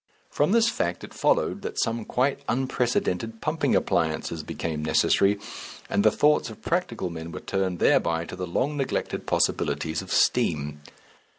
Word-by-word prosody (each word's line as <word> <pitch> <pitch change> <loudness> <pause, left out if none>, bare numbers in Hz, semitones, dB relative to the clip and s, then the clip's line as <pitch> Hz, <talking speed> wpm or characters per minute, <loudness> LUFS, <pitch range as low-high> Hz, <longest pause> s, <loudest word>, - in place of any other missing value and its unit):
From 145 +5 +1
this 230 +1 +4
fact 85 - -1
it - - -10
followed - - +1
that - - -4
some 115 -1 -1
quite 135 +3 0
unprecedented 120 -4 -1
pumping 155 +5 0
appliances 80 0 0
became 75 0 -4
necessary, 100 +6 +3 0.5
and 100 - +2
the 110 - +7
thoughts 150 +5 +2
of 110 - -12
practical 175 - -1
men 80 0 -7
were - - -6
turned 95 -2 -2
thereby 85 0 +2
to - - -8
the 90 - -4
long 135 - -1
neglected 135 -2 -2
possibilities 80 0 0
of - - -10
steam. 75 0 +1
100 Hz, 155 wpm, -26 LUFS, 85-135 Hz, 0.5 s, the